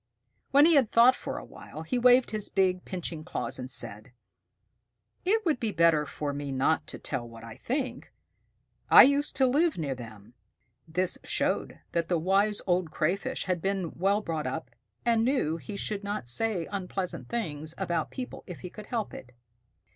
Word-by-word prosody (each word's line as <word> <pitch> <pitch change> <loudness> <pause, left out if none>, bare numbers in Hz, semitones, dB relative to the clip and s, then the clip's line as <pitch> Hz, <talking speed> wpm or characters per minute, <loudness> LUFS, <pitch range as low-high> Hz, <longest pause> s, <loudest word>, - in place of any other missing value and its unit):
When 285 +2 +6
he 335 - +6
had 270 -7 +4
thought 240 +3 +6
for - - -5
a - - -7
while, 155 - -10
he 245 +10 -1
waved 250 +1 +5
his 215 -2 -1
big 185 -2 +1
pinching 170 -4 -5
claws - - -4
and 125 0 -6
said, 110 -1 -4 1.1
"It 430 +3 +2
would 310 -7 +1
be 225 -2 -1
better 165 -4 +3
for 145 -1 -4
me 140 0 -4
not 135 +4 +1
to - - -6
tell 120 -4 -4
what 115 0 -12
I 115 -1 -9
think. 255 - -3 0.8
I - - +11
used 285 +2 +2
to 265 - +4
live 300 +6 +2
near 145 -5 -2
them." 115 -3 -11 0.5
This 180 +3 -1
showed - - -1
that 170 -1 0
the 175 - +1
Wise 195 +5 +2
Old 180 -2 +1
Crayfish 170 +5 -1
had 180 -3 -1
been 190 -3 -1
well 200 +4 +1
brought 160 -7 -3
up, 125 -1 -5 0.3
and 230 -1 +3
knew 230 - +1
he 165 +6 -7
should 205 -1 -3
not 205 -10 -3
say 185 - +1
unpleasant 190 -2 -4
things 160 -9 -4
about 170 -2 -1
people 255 -1 -7
if 180 - -8
he 180 - -7
could 210 -1 -10
help 230 -4 -3
it. 125 0 -10
185 Hz, 180 wpm, -28 LUFS, 155-225 Hz, 1.1 s, I